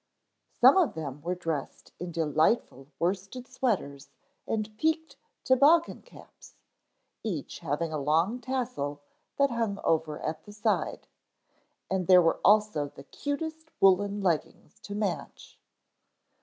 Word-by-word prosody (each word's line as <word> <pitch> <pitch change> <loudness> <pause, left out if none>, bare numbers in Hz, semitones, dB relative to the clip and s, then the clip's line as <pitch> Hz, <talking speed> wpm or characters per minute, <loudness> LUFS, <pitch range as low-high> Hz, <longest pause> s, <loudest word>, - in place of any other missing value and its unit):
Some - - +8
of 360 -6 +2
them 145 -3 -6
were 175 +4 -2
dressed 165 -5 -5
in 180 0 -5
delightful 155 - +1
worsted 195 +8 -2
sweaters 205 - -2 0.4
and 215 -1 -2
peaked 320 +5 -1 0.3
toboggan 295 +6 +4
caps, - - -17 0.7
each 180 -10 -4
having 160 +1 -2
a 155 - -1
long 165 - +1
tassel 235 - -3 0.3
that 280 -1 +3
hung 225 -4 -1
over 160 -2 0
at 155 0 -3
the 205 - -12
side. 210 - -1 0.8
And 185 -3 0
there 185 -1 +8
were 165 -2 +2
also 210 -8 +4
the 140 - -13
cutest 315 - -5
woolen 200 +2 +3
leggings 185 +4 -2
to 205 -1 -8
match. 205 -4 -4
195 Hz, 125 wpm, -28 LUFS, 160-240 Hz, 0.8 s, Some